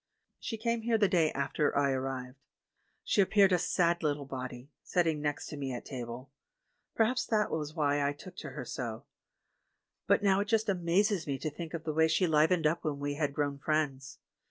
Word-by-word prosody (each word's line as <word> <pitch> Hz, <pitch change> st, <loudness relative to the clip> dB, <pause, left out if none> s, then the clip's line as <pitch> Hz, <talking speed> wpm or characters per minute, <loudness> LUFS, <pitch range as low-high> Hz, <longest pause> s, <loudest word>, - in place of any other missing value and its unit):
She 225 Hz, -, -4 dB
came 230 Hz, +1 st, -1 dB
here 225 Hz, 0 st, +2 dB
the 210 Hz, -2 st, +4 dB
day 165 Hz, -4 st, +2 dB
after 140 Hz, +2 st, 0 dB
I 140 Hz, -1 st, +3 dB
arrived. 130 Hz, 0 st, -4 dB, 0.6 s
She 205 Hz, -, +3 dB
appeared 195 Hz, 0 st, +4 dB
a 180 Hz, -, +4 dB
sad 170 Hz, 0 st, +1 dB
little 145 Hz, -2 st, -1 dB
body, 130 Hz, 0 st, -7 dB
sitting 165 Hz, -4 st, 0 dB
next 145 Hz, -1 st, -2 dB
to 150 Hz, -, -7 dB
me 135 Hz, -2 st, -3 dB
at 120 Hz, -, -6 dB
table; 125 Hz, +1 st, -7 dB, 0.6 s
perhaps 235 Hz, +3 st, +2 dB
that 215 Hz, -2 st, +1 dB
was 155 Hz, 0 st, -3 dB
why 145 Hz, -2 st, +1 dB
I 140 Hz, -, +2 dB
took 180 Hz, +5 st, -11 dB
to -, -, -6 dB
her 135 Hz, -5 st, -7 dB
so; 120 Hz, +1 st, -5 dB, 1.0 s
but -, -, +3 dB
now 195 Hz, -1 st, +4 dB
it 205 Hz, -, -1 dB
just 220 Hz, -1 st, +1 dB
amazes 185 Hz, 0 st, +1 dB
me 140 Hz, -1 st, -1 dB
to 155 Hz, +2 st, -3 dB
think 165 Hz, +2 st, -6 dB
of 165 Hz, -, -5 dB
the 155 Hz, -, -2 dB
way 160 Hz, +1 st, +4 dB
she 180 Hz, +3 st, +2 dB
livened 160 Hz, +1 st, +3 dB
up 160 Hz, +3 st, +1 dB
when 150 Hz, -3 st, -1 dB
we 145 Hz, 0 st, -2 dB
had 145 Hz, -1 st, -1 dB
grown 145 Hz, -2 st, -1 dB
friends. 140 Hz, -3 st, -1 dB
155 Hz, 200 wpm, -31 LUFS, 140-180 Hz, 1.0 s, the